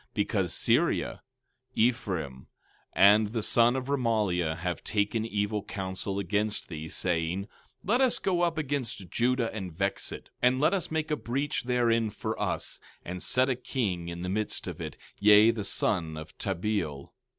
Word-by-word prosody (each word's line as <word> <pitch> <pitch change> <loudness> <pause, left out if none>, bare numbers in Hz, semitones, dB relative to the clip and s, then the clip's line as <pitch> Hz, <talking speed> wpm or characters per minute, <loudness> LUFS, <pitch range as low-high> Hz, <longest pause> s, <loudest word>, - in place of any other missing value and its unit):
17:5 - - -33
Because 100 -5 0
Syria, - - +1 0.5
Ephraim, 95 - 0 0.5
and 105 +2 +6
the 110 +1 -3
son 120 +3 +4
of 130 -1 -2
Remaliah, 105 - 0
have 90 +1 -3
taken 110 +2 0
evil 105 -1 -1
counsel 95 -1 -4
against 105 +2 -1
thee, 80 -2 -6
saying: 85 +2 0
17:6 - - -14 0.4
Let 235 +7 +2
us 260 -2 +4
go 180 -2 0
up 170 -2 +1
against 135 - -3
Judah 120 -1 +1
and 95 -5 -5
vex 95 +4 -2
it, - - -9
and 125 +1 +3
let 150 +7 +3
us 190 -3 0
make 160 0 -2
a - - +3
breach 135 0 -2
therein 115 -3 +2
for - - -4
us, - - -3 0.3
and 90 +1 -5
set 130 +1 +3
a 130 - +1
king 105 -9 -2
in 85 0 -5
the - - -3
midst 105 +3 -1
of - - -6
it, - - -6 0.2
yea, 105 +2 +7
the 110 -3 -4
son 85 -5 0
of 80 0 -9
Tabeal. 95 -7 -2
105 Hz, 170 wpm, -28 LUFS, 90-125 Hz, 0.5 s, yea